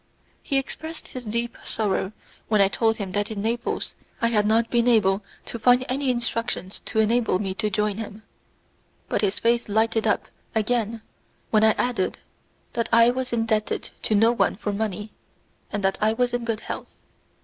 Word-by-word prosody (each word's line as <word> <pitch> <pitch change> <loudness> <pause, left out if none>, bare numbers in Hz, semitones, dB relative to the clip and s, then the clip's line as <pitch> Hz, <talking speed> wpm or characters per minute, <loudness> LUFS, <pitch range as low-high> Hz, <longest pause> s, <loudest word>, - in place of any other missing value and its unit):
He 275 - 0
expressed 315 +4 -5
his 255 - -7
deep 235 +2 -2
sorrow 205 -3 -1 0.4
when 215 -1 +3
I 195 -1 +5
told 225 +1 +2
him 195 -3 -4
that 205 +2 -1
in 215 -2 -4
Naples 235 +2 -1 0.3
I 230 -3 +2
had 210 -2 +2
not 225 +1 +2
been 235 0 +3
able 205 -4 +4 0.2
to 235 - -6
find 250 +2 +5
any 270 +1 0
instructions 230 -5 -1
to - - -4
enable 225 -2 +3
me 190 -1 -2
to 210 +2 -1
join 210 -1 0
him, 215 -1 -7 0.9
but - - +1
his 200 -2 +1
face 235 -1 +1
lighted 220 +1 +2
up 210 - +1 0.3
again 225 0 0 0.5
when 215 -1 +4
I 220 0 +6
added 245 -7 0 0.6
that 230 -1 -1
I 230 +1 +7
was 255 0 -3
indebted 225 -2 0
to 215 - +1
no 225 +3 +5
one 240 - +2
for 205 +1 -3
money, 210 0 -3 0.6
and 205 -1 -2
that 195 0 +1
I 215 +1 +3
was 245 +1 +1
in 245 -1 -1
good 225 -2 -1
health. - - -7
225 Hz, 180 wpm, -25 LUFS, 210-235 Hz, 0.9 s, I